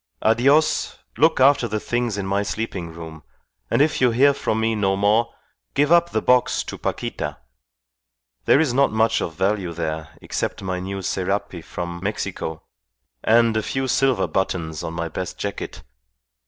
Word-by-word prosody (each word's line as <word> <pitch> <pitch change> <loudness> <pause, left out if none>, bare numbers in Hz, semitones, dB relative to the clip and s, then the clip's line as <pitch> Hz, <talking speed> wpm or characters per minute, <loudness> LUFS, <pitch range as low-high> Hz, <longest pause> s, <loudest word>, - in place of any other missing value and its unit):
"Adios, 135 +8 +3 0.2
look 160 -1 +3
after 130 -2 +5
the 110 -1 -2
things 120 -2 -1
in 100 - -3
my 100 +1 0
sleeping 100 -5 -4
room, 80 -1 -9 0.5
and 140 - +4
if 155 -2 0
you 125 - +5
hear 135 +5 +4
from 110 -5 -1
me 115 0 +1
no 100 -3 +1
more, 105 +4 +2 0.4
give 145 +2 +2
up 170 0 +5
the 110 - -1
box 125 -1 +3
to - - -7
Paquita. - - -4 1.1
There - - +5
is 150 -6 +2
not 140 +2 +3
much 110 +1 +2
of 80 - -4
value 95 -1 0
there, 80 -2 -4
except - - -3
my 95 -1 -2
new 95 +1 -5
serape 95 -2 -2
from 85 0 -5
Mexico, 95 -5 -4 0.6
and 115 0 +4
a 110 - +2
few 135 +4 -2
silver 130 -6 +2
buttons 80 -3 -2
on 80 - -5
my 85 -1 -2
best 90 +3 -5
jacket. 100 -1 -5
105 Hz, 165 wpm, -22 LUFS, 90-120 Hz, 1.1 s, after